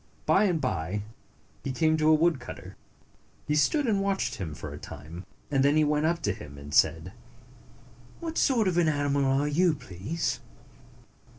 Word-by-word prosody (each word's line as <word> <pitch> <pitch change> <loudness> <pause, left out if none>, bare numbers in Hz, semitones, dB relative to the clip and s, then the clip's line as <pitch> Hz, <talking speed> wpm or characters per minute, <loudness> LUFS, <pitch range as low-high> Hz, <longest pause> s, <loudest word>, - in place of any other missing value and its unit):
By - - +4
and 175 -5 +1
by, 95 - -2 0.6
he 135 - -2
came 155 +5 +2
to 155 0 +3
a - - +7
woodcutter. 160 -4 -1 0.7
He 150 - 0
stood 290 - +2
and 205 -5 +1
watched 195 -1 -1
him 85 -7 -5
for - - -7
a - - -8
time, 80 +5 -9 0.2
and 135 -2 +3
then 140 +2 +4
he 155 - +5
went 150 +1 +2
up 170 0 -1
to 105 - +1
him, 70 -6 -11
and 70 +1 -9
said, - - +2 1.1
"What 330 -1 -5
sort 235 -7 +3
of 175 -1 +2
an 170 - +3
animal 145 -2 +1
are 135 +2 +2
you, 165 +2 +2
please?" 105 - -4
150 Hz, 175 wpm, -28 LUFS, 105-170 Hz, 1.1 s, a